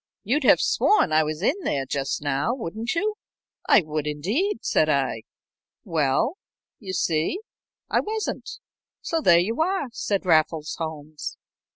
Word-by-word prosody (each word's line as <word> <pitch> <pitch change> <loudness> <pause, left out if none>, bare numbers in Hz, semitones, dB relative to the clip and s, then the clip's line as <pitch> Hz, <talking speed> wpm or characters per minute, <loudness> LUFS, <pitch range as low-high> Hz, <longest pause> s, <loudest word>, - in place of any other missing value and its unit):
You'd 265 +7 0
have - - +6
sworn 415 - +3
I 155 0 +5
was 155 +3 -4
in 295 - +2
there 135 -1 -1
just 140 +2 -2
now, 145 - 0
wouldn't 225 - -4
you?" 425 +5 0 0.5
"I - - +7
would 155 -1 -3
indeed," 210 - -1
said - - +2
I. - - +1 0.6
"Well 165 - 0 0.4
you 195 -4 -6
see, 165 - 0 0.5
I - - +2
wasn't, 435 0 -3 0.5
so 330 -2 -1
there 170 - +6
you 220 - +1
are," 350 -5 0
said 200 -4 -2
Raffles 155 -2 +2
Holmes. 155 -2 -6
175 Hz, 145 wpm, -24 LUFS, -, 0.6 s, I